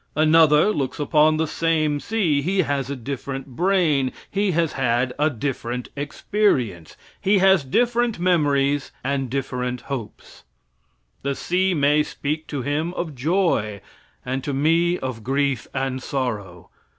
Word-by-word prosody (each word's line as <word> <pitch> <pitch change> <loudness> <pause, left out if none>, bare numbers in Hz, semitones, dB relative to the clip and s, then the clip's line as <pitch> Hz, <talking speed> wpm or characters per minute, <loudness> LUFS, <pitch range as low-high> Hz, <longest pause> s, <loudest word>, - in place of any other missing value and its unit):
Another 155 +3 +5
looks 140 -8 -3
upon 155 +1 +3
the 160 - +1
same 155 -2 0
sea. 175 -8 0
He 185 +5 +1
has 140 -3 -2
a 140 - -2
different 135 +1 -5
brain, 165 -7 +2 0.2
he 200 0 +1
has 170 -2 +1
had 125 -1 0
a 150 +1 +3
different 125 -2 -4
experience, 140 - -1 0.2
he 200 +1 +3
has 190 -4 +5
different 240 - +1
memories 145 -5 +1
and 135 -1 -1
different 125 -2 -3
hopes. 125 -4 -8 0.8
The 140 0 -2
sea 185 +4 0
may 145 0 +3
speak 150 +1 -3
to 140 -4 -4
him 155 +6 -2
of 165 -3 -3
joy 135 - 0 0.5
and 130 +1 -3
to 140 - -2
me 165 +5 +2
of 130 -7 -5
grief 135 0 0
and 130 -1 -2
sorrow. 105 -11 -4
145 Hz, 140 wpm, -22 LUFS, 130-165 Hz, 0.8 s, Another